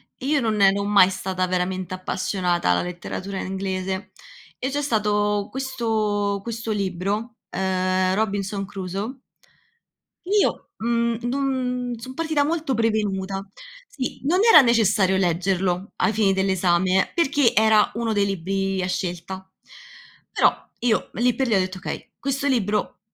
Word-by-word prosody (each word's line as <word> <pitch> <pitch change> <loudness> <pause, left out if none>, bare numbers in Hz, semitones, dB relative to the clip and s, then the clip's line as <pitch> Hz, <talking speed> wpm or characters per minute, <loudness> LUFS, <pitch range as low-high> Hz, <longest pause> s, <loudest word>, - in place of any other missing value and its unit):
e 260 - -9
io 295 0 +3
non 215 -3 0
ero 195 +1 +4
mai 200 -2 +5
stata 185 -1 -2
veramente 185 0 -2
appassionata 185 - -1
alla 90 - +3
letteratura 180 +2 -5
inglese. 190 0 -3 0.5
E 260 - -1
c'è 290 +1 -1
stato 210 -5 +1
questo 220 -6 -1
questo 230 0 -4
libro, 205 +3 -2
ehm, 185 0 0
Robinson 200 -1 -1
Crusoe 195 +5 -5 1.1
io, 405 +2 +1
mhmm, 235 0 0
non 250 -2 -1
son 260 +3 -8
partita 315 -1 0
molto 315 -2 -1
prevenuta 200 -4 -1 0.4
Sì, 260 -4 -5
non 335 +7 +2
era 310 - +10
necessario 210 -6 +3
leggerlo 185 +1 0
ai 220 - +2
fini 205 -2 +3
dell'esame, 190 -1 +2
perché 290 -6 +3
era 220 0 +4
1 230 -1 -1
dei 205 -1 +2
libri 195 0 -1
a 180 - -1
scelta. 185 +1 -4 0.8
Però, - - +5 0.3
io 240 -3 +1
lì 245 0 +2
per 265 +1 0
lì 230 - +1
ho - - +4
detto: 185 0 -2
"Okay, 190 - -7
questo 275 +1 -2
libro, 210 -6 0
205 Hz, 135 wpm, -23 LUFS, 190-235 Hz, 1.1 s, era